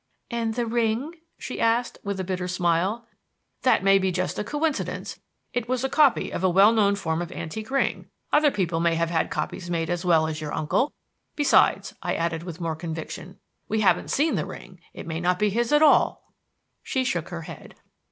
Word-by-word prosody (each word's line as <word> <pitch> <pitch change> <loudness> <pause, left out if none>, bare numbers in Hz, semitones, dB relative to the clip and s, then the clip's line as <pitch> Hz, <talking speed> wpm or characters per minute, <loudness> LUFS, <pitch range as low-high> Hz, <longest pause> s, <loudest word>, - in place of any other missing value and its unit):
"And 230 -2 -1
the 240 -1 0
ring?" 235 +6 0 0.2
she - - -6
asked, 235 +2 +1
with 200 -2 -3
a - - -1
bitter 180 -1 -3
smile. 180 +6 0 0.5
"That 255 - +3
may 195 0 +5
be 190 -1 0
just 185 +1 -2
a - - -1
coincidence. 295 +5 -2 0.3
It 245 -1 -2
was 255 0 0
a 265 - 0
copy 285 -4 +3
of - - -4
a 185 - +4
well 195 +5 +6
known 200 -3 +3
form 160 -3 -2
of 175 0 -5
antique 215 +8 -6
ring. 275 0 0 0.3
Other 295 0 +5
people 175 -9 -1
may 170 0 +2
have 165 0 0
had 165 -2 +1
copies 175 -2 -4
made 165 -1 -1
as 175 0 -2
well 165 -3 +4
as 160 0 -4
your 150 -1 -4
uncle. 205 - 0 0.4
Besides," 290 -2 +3
I - - -1
added 165 -1 -1
with 170 -1 -8
more 165 -2 -2
conviction, 165 +3 -7 0.3
"we 220 0 0
haven't 200 - +2
seen 310 +3 +2
the - - -1
ring. - - -11
It - - -9
may 165 0 -4
not 180 +1 +1
be 210 +1 +1
his 235 +3 0
at 295 +1 +5
all." 305 - +4 0.6
She 260 - -1
shook 265 +1 -2
her - - -6
head. - - -11
195 Hz, 200 wpm, -25 LUFS, 170-235 Hz, 0.6 s, well